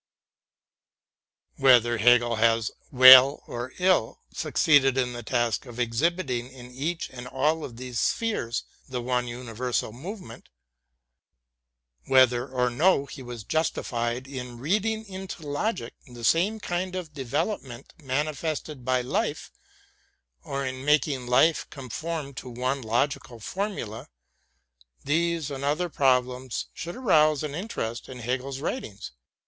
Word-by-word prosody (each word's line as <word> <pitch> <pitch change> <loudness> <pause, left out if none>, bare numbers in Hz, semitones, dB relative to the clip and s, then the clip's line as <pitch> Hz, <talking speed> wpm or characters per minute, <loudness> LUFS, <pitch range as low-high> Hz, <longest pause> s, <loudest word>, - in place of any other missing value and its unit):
Whether 120 -3 +5
Hegel 120 0 +4
has 115 0 +2 0.2
well 130 +1 +9
or 120 +2 -6
ill 180 -11 +2 0.2
succeeded 135 -4 +3
in 125 -2 0
the 120 - -6
task 120 +1 -1
of 120 0 -9
exhibiting 125 +1 -1
in 125 -1 -12
each 155 +7 -3
and 125 -1 -8
all 150 +5 0
of 120 -5 -8
these 125 -2 -4
spheres 205 - -1 0.3
the 125 -1 -3
one 125 0 -1
universal 120 -1 -3
movement, 150 - -9 1.6
whether 130 -1 +4
or 125 -2 0
no 145 +3 +3
he 140 - -10
was 120 -3 -8
justified 120 -4 -1
in 125 -3 -7
reading 215 - -1
into 190 -5 -8
logic 145 - -2
the 120 -2 -11
same 190 - +2
kind 185 -1 -3
of 170 -5 -5
development 135 - -4
manifested 150 +1 -3
by 130 0 +1
life, 125 - -2 0.9
or 140 0 -3
in 130 0 -5
making 140 -3 +1
life 140 +6 +3
conform 145 +2 -5
to 130 0 -8
one 130 +3 -2
logical 120 +1 -1
formula 120 - -4 0.5
— - - -34
these 165 0 0
and 135 -1 -5
other 155 +5 0
problems 130 -3 0
should 175 +1 -6
arouse 155 - +3
an 150 -2 -4
interest 145 - -4
in 130 - -8
Hegel's 130 +3 -3
writ 255 - -2
ings. 100 - -9
130 Hz, 130 wpm, -26 LUFS, 120-155 Hz, 1.6 s, well